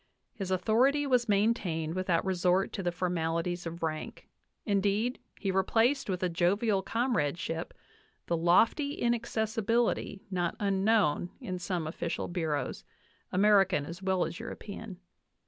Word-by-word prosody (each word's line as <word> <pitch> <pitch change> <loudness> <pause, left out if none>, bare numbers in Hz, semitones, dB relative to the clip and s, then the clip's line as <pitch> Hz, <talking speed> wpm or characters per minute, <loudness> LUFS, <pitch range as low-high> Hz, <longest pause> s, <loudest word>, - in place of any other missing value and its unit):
His 195 -3 -5
authority 240 +10 +3
was 250 -4 +2
maintained 195 -7 +1
without 180 -2 0
resort 185 0 +1
to - - -3
the 175 -1 0
formalities 175 0 -1
of 165 +1 -7
rank; 155 -1 -4 0.4
indeed, 205 +4 +1 0.2
he 195 - -1
replaced 225 +8 +2
with 185 -1 -2
a - - +3
jovial 190 +4 +1
comradeship 170 - -1 0.5
the 170 - 0
lofty 220 - +3
inaccessibility 230 -2 0
not 175 -2 -1
unknown 195 -4 +2
in 180 -1 -5
some 180 -2 -2
official 165 +2 -3
bureaus, 160 -5 -2 0.5
American 195 -5 +4
as 170 +4 -8
well 190 -1 +1
as - - -6
European. 205 -2 -7
190 Hz, 125 wpm, -30 LUFS, 175-220 Hz, 0.5 s, American